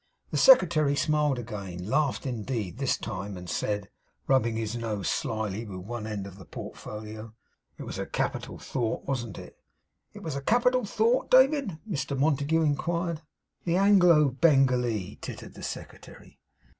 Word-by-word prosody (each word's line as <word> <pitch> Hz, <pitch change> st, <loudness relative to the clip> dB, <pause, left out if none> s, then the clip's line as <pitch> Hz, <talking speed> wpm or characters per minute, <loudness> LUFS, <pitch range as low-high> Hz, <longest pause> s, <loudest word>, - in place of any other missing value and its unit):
The -, -, -1 dB
secretary 155 Hz, -, +6 dB
smiled 150 Hz, -2 st, +1 dB
again; 100 Hz, -6 st, -6 dB
laughed, 145 Hz, +4 st, +1 dB
indeed, 115 Hz, -4 st, -3 dB
this 135 Hz, -2 st, +1 dB
time; 100 Hz, -2 st, -5 dB
and 90 Hz, 0 st, -9 dB
said, 105 Hz, +2 st, -2 dB, 0.4 s
rubbing 120 Hz, -4 st, +2 dB
his 110 Hz, 0 st, -2 dB
nose 110 Hz, -5 st, -3 dB
slily 110 Hz, -5 st, -2 dB
with 95 Hz, -4 st, -8 dB
one 115 Hz, -1 st, -5 dB
end 105 Hz, -3 st, -4 dB
of 100 Hz, 0 st, -11 dB
the 95 Hz, -, -11 dB
portfolio: 110 Hz, +4 st, -8 dB, 0.4 s
'It -, -, -7 dB
was -, -, -6 dB
a -, -, -3 dB
capital -, -, -3 dB
thought, 120 Hz, -4 st, -3 dB
wasn't 120 Hz, -7 st, -3 dB
it?' -, -, -11 dB, 0.5 s
'What -, -, -10 dB
was 160 Hz, -4 st, -3 dB
a 140 Hz, -, -3 dB
capital 245 Hz, -, +2 dB
thought, 225 Hz, +5 st, +1 dB
David?' 260 Hz, -, +4 dB
Mr 140 Hz, -7 st, -2 dB
Montague 150 Hz, +3 st, +2 dB
inquired. 170 Hz, +2 st, -1 dB, 0.4 s
'The 170 Hz, 0 st, +1 dB
Anglo 180 Hz, -7 st, +5 dB
Bengalee,' 125 Hz, -, +2 dB
tittered -, -, -8 dB
the -, -, -12 dB
secretary. -, -, -9 dB
130 Hz, 150 wpm, -28 LUFS, 110-155 Hz, 0.5 s, secretary